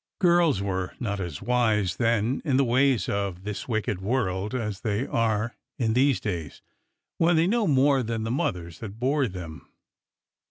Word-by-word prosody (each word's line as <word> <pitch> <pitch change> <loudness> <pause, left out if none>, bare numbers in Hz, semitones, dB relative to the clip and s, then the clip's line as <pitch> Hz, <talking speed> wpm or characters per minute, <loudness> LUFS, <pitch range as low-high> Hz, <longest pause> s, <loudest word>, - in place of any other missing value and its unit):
Girls 170 - +3
were 95 -2 -3
not 100 -4 -2
as 85 -6 -5
wise 110 -7 +1
then 115 +2 +1
in 140 -5 +1
the 140 - +4
ways 130 0 +2
of 100 -2 -2
this 105 0 -5
wicked 110 -5 -1
world 105 -1 -1
as 105 -5 -3
they 110 +4 -1
are 115 -1 0 0.2
in 115 -5 +1
these 135 +1 +3
days, 85 -8 -5 0.6
when 170 +1 +4
they 160 +1 +4
know 220 +2 +1
more 140 -1 +4
than 115 -1 -3
the 115 - -2
mothers 85 - -2
that 110 -1 -8
bore 135 +2 +1
them. 90 -5 -9
115 Hz, 165 wpm, -26 LUFS, 100-130 Hz, 0.6 s, the